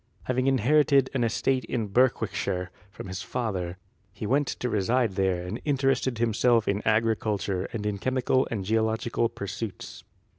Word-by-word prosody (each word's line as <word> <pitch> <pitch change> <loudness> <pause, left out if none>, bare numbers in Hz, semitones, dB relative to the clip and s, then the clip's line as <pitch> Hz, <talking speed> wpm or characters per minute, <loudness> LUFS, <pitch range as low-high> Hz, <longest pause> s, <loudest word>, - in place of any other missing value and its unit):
Having 130 +1 0
inherited 135 +1 +3
an 130 -3 +1
estate 130 +3 +1
in 115 -4 -2
Berwickshire 100 -5 0 0.2
from 100 - -9
his 95 0 -5
father, 95 -8 -3 0.3
he 105 +2 -7
went 140 +5 +2
to 125 - -3
reside 115 +2 +1
there 95 -2 0
and 100 +7 -5
interested 135 -3 +1
himself 115 0 +2
in 100 +1 0
agriculture 110 -4 +1
and 105 -3 -4
in 105 -1 -2
chemical 130 +2 +1
and 100 -5 -3
geological 110 +2 0
pursuits. 100 0 -6
115 Hz, 145 wpm, -27 LUFS, 100-130 Hz, 0.3 s, inherited